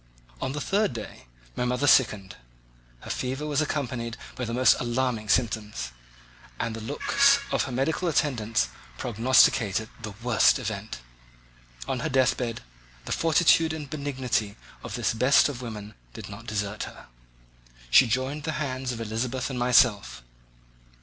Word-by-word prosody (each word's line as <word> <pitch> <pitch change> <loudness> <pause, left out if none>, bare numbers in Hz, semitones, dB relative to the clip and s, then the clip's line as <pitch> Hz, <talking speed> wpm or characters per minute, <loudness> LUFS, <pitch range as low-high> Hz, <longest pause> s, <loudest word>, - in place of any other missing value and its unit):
On 130 0 -2
the 150 - -3
third 200 - 0
day 110 - -9 0.3
my - - -1
mother 125 +3 0
sickened; 105 -9 +3 0.7
her - - -6
fever 135 +4 -3
was 150 -1 0
accompanied 125 -6 -3 0.2
by 125 - -3
the 115 - -4
most 130 +1 +5
alarming 120 -3 -1
symptoms, 105 - 0 0.7
and 115 -1 -2
the 115 - -7
looks 275 - +3
of - - +1
her 135 - -6
medical 140 +8 -1
attendants 115 - 0 0.3
prognosticated 115 - +3
the 105 -2 -7
worst 120 -4 +4
event. - - -5 0.9
On - - -2
her - - -2
deathbed 125 -2 +1 0.4
the - - -6
fortitude 165 0 +3
and 150 -3 -7
benignity 130 -8 -2 0.2
of - - -6
this - - 0
best 125 +5 +4
of 135 -4 -6
women 110 -3 -7 0.2
did - - -8
not - - -10
desert 105 0 -3
her. - - -12 0.9
She 130 - +7
joined 130 +6 -1
the 160 +2 -3
hands 130 -4 -3
of 120 - -6
Elizabeth 120 +4 -3
and 125 - -4
myself. 105 - +3
125 Hz, 145 wpm, -26 LUFS, 110-140 Hz, 0.9 s, She